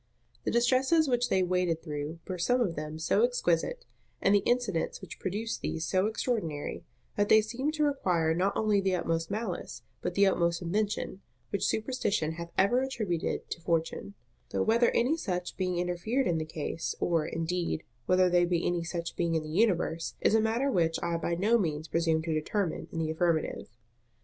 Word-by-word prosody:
The -, -, +1 dB
distresses 260 Hz, +7 st, +3 dB
which 245 Hz, -1 st, +1 dB
they 190 Hz, -1 st, +3 dB
waded 180 Hz, -2 st, 0 dB
through 150 Hz, 0 st, -4 dB
were 185 Hz, -2 st, -4 dB
some 245 Hz, +9 st, +2 dB
of 195 Hz, -9 st, 0 dB
them 155 Hz, +1 st, -5 dB
so 165 Hz, +6 st, +2 dB
exquisite, 245 Hz, -, +1 dB, 0.3 s
and 195 Hz, -, +3 dB
the 205 Hz, -, +6 dB
incidents 240 Hz, -9 st, 0 dB
which -, -, -10 dB
produced 210 Hz, +4 st, -3 dB
these 160 Hz, -, -2 dB
so 190 Hz, +2 st, +2 dB
extraordinary, 210 Hz, -, -2 dB, 0.3 s
that 205 Hz, -, +2 dB
they 220 Hz, -, +8 dB
seemed 255 Hz, +8 st, -2 dB
to 305 Hz, -, +1 dB
require 180 Hz, -, +1 dB
not 185 Hz, +4 st, 0 dB
only 210 Hz, -2 st, +2 dB
the 190 Hz, -1 st, +1 dB
utmost 165 Hz, -2 st, -1 dB
malice, 200 Hz, -, -4 dB, 0.2 s
but 180 Hz, -, -3 dB
the 200 Hz, -, +5 dB
utmost 170 Hz, -3 st, +2 dB
invention, 200 Hz, +2 st, -2 dB, 0.3 s
which 200 Hz, -, 0 dB
superstition 215 Hz, -, 0 dB
hath 170 Hz, +1 st, -6 dB
ever 240 Hz, +7 st, +4 dB
attributed 215 Hz, -11 st, -2 dB
to 170 Hz, -, -4 dB
Fortune: 165 Hz, +4 st, -1 dB, 0.3 s
though -, -, 0 dB
whether 235 Hz, +2 st, +4 dB
any 260 Hz, +7 st, +2 dB
such 180 Hz, -, -3 dB
being 180 Hz, -2 st, -1 dB
interfered 180 Hz, +9 st, 0 dB
in 165 Hz, -2 st, +1 dB
the 155 Hz, -, -2 dB
case, 160 Hz, +1 st, -4 dB
or, 165 Hz, -3 st, +1 dB
indeed, 165 Hz, 0 st, -2 dB, 0.2 s
whether 185 Hz, 0 st, +4 dB
there 175 Hz, 0 st, +3 dB
be 175 Hz, -1 st, 0 dB
any 175 Hz, -1 st, 0 dB
such 170 Hz, 0 st, -4 dB
being 170 Hz, -1 st, 0 dB
in 160 Hz, -, 0 dB
the 155 Hz, -, -7 dB
universe, 170 Hz, -3 st, +1 dB
is -, -, +2 dB
a 220 Hz, -, +5 dB
matter 235 Hz, +5 st, +1 dB
which 165 Hz, -6 st, +2 dB
I 170 Hz, -1 st, 0 dB
by 170 Hz, +1 st, -1 dB
no 215 Hz, +7 st, +3 dB
means 155 Hz, -4 st, -2 dB
presume 165 Hz, -1 st, +1 dB
to 160 Hz, -1 st, -1 dB
determine 165 Hz, +4 st, -1 dB
in -, -, -6 dB
the 160 Hz, -1 st, 0 dB
affirmative. 160 Hz, 0 st, 0 dB
180 Hz, 185 wpm, -29 LUFS, 165-220 Hz, 0.3 s, they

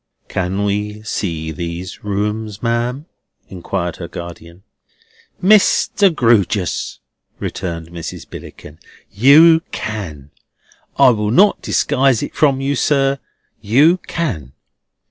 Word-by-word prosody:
"Can 95 Hz, +2 st, -2 dB
we 105 Hz, +1 st, -3 dB
see 80 Hz, -7 st, -3 dB
these 85 Hz, +3 st, -6 dB
rooms, 105 Hz, +1 st, -3 dB
ma'am?" 120 Hz, +4 st, -1 dB, 0.4 s
inquired 90 Hz, -1 st, -4 dB
her 85 Hz, -, -7 dB
guardian. 85 Hz, +1 st, -10 dB, 0.8 s
"Mr. 200 Hz, 0 st, +4 dB
Grewgious," 110 Hz, -, +1 dB, 0.4 s
returned 85 Hz, -3 st, -5 dB
Mrs. 85 Hz, -1 st, -8 dB
Billickin, 75 Hz, +1 st, -11 dB, 0.3 s
"you 155 Hz, -, +6 dB
can. 80 Hz, -10 st, -6 dB, 0.7 s
I -, -, +7 dB
will 105 Hz, -3 st, 0 dB
not 195 Hz, -, +4 dB
disguise 130 Hz, -3 st, +1 dB
it -, -, -6 dB
from 140 Hz, -3 st, +2 dB
you, 140 Hz, +1 st, -1 dB
sir; 135 Hz, +1 st, +1 dB, 0.4 s
you 145 Hz, -, +4 dB
can." 85 Hz, -, -3 dB
105 Hz, 105 wpm, -18 LUFS, 85-135 Hz, 0.8 s, I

